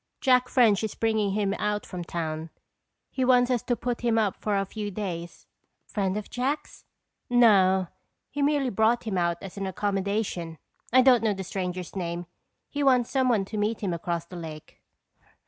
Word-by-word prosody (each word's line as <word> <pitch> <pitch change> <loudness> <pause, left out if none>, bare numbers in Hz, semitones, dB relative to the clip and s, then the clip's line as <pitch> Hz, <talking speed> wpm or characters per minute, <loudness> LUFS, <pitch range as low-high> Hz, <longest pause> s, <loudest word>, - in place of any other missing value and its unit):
Jack 250 -3 +3
French 225 -5 +4
is 220 - -3
bringing 220 -3 +1
him 200 -1 0
out 210 0 -1
from 180 -2 -6
town. 160 -1 -4 0.6
He 260 - -1
wants 250 0 +4
us 245 -3 +1
to 245 - 0
put 240 0 -3
him 235 -2 +2
up 210 -3 +1
for 210 -2 0
a 195 - 0
few 210 +1 -5
days." 180 -4 -6 0.4
"Friend 195 -1 -1
of 210 - -5
Jack's?" 270 +5 -3 0.4
"No, 195 -6 +5 0.5
he 290 - -3
merely 280 -3 +2
brought 220 +4 +2
him 220 -4 -3
out 170 -1 +1
as 195 0 -9
an 195 -1 -2
accommodation. 195 -3 -2 0.3
I 255 +1 +6
don't 250 -2 +6
know 215 -2 +2
the 190 - -5
stranger's 180 -1 -4
name. 175 -1 -3 0.4
He 290 - -4
wants 255 -4 +3
someone 250 -7 +2
to 215 - -6
meet 210 +2 -1
him 190 -4 -1
across 170 0 -3
the 180 +1 -10
lake." 155 -3 -9
205 Hz, 180 wpm, -27 LUFS, 185-240 Hz, 0.6 s, I